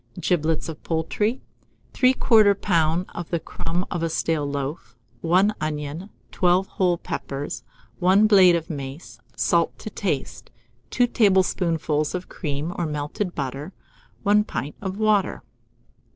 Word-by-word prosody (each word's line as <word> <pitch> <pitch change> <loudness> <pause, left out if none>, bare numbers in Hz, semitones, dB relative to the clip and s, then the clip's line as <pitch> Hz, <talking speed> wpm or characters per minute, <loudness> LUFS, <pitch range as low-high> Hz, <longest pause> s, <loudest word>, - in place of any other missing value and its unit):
Giblets 160 -2 0
of 160 -2 -7
poultry, 205 +9 -1 0.5
3/4 225 -5 +5
lb. 170 -2 +1
of 175 -2 -6
the 170 - 0
crumb 175 +3 -3
of 175 - -2
a 165 - 0
stale 160 -2 0
loaf, 140 -3 -5 0.3
1 185 +5 +3
onion, 155 +4 -4 0.2
12 180 +1 +3
whole 180 -2 +1
peppers, 140 -3 -5 0.4
1 190 +3 +5
blade 190 -5 +7
of 165 -1 -2
mace, 140 0 -7 0.2
salt - - +1
to - - -8
taste, - - -3 0.4
2 245 - +3
tablespoonfuls 180 -8 +1
of 180 0 -5
cream 150 +1 -3
or 170 - 0
melted 150 +5 -3
butter, 140 +5 -4 0.5
1 210 0 +4
pint 140 - -4
of 190 -1 -4
water. 215 -2 +1
170 Hz, 130 wpm, -24 LUFS, 150-195 Hz, 0.5 s, blade